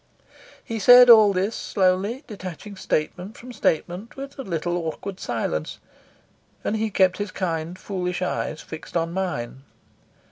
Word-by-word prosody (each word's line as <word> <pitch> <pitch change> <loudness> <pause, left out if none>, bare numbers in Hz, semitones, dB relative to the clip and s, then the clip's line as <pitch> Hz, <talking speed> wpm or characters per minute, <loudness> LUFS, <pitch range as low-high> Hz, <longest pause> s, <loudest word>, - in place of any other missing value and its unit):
He 225 -1 -4
said 245 +3 +9
all 215 -3 +8
this 195 +4 -1
slowly, 195 +7 0
detaching 200 -1 -8
statement 180 +3 -3
from 250 +1 -10
statement 180 +1 -1
with 275 0 -8
a - - -2
little 175 -5 -2
awkward 175 +3 -5
silence, 80 -10 -3 0.9
and 215 - -1
he 220 0 -1
kept 185 -2 +3
his 205 -1 -2
kind, 170 -2 -3
foolish 180 -2 -3
eyes 160 -3 -3
fixed 160 +2 -6
on 165 0 -1
mine. 175 -10 -3
185 Hz, 140 wpm, -24 LUFS, 170-215 Hz, 0.9 s, said